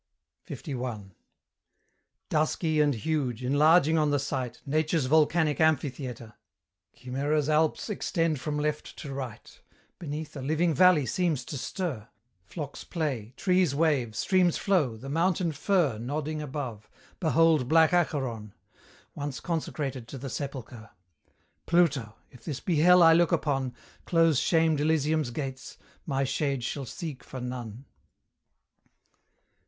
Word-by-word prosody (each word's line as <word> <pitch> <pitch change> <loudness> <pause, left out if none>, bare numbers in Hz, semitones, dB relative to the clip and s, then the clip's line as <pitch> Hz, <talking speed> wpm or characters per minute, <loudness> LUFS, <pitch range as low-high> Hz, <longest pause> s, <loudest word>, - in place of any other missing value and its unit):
LI. 120 -8 -5 1.2
Dusky 155 0 +1
and 145 -3 +2
huge, 125 -1 -2
enlarging 155 +4 +4
on 150 -1 +2
the 145 - +2
sight, 130 -3 -3
Nature's 155 +1 +1
volcanic 155 +1 +2
amphitheatre, 130 -7 -1 0.6
Chimera's 140 +3 -1
alps 155 0 +1
extend 165 - -1
from 150 +3 -3
left 150 0 -3
to 140 - -7
right: 130 -5 -8 0.4
Beneath, 155 -1 -6
a 140 - -5
living 160 +5 +1
valley 180 -4 +5
seems 160 -6 -1
to - - -6
stir; 140 - -4 0.4
Flocks 145 - -7
play, 130 - -3
trees 180 -6 +2
wave, 140 -8 +1
streams 185 -3 +2
flow, 155 - +1
the 130 - -10
mountain 170 +3 +1
fir 155 - +1
Nodding 150 +5 -3
above; 130 -7 -6 0.3
behold 160 -5 +3
black 160 +1 +5
Acheron! 130 - -1 0.6
Once 145 -3 -5
consecrated 145 -7 -3
to 135 - -8
the 135 0 -6
sepulchre. 125 -6 -6 0.8
Pluto! 145 -11 +2 0.2
if 120 -2 -16
this 140 0 -4
be 170 -4 -1
hell 180 +3 +6
I 165 0 +8
look 170 -1 +3
upon, 135 -4 0 0.3
Close 165 -4 +3
shamed 160 -3 +2
Elysium's 155 -2 +1
gates, 130 0 -6 0.3
my 135 -2 0
shade 135 -1 -1
shall 135 +2 -4
seek 150 +1 -7
for 130 - -8
none. 125 -1 -6
145 Hz, 125 wpm, -28 LUFS, 130-160 Hz, 1.2 s, I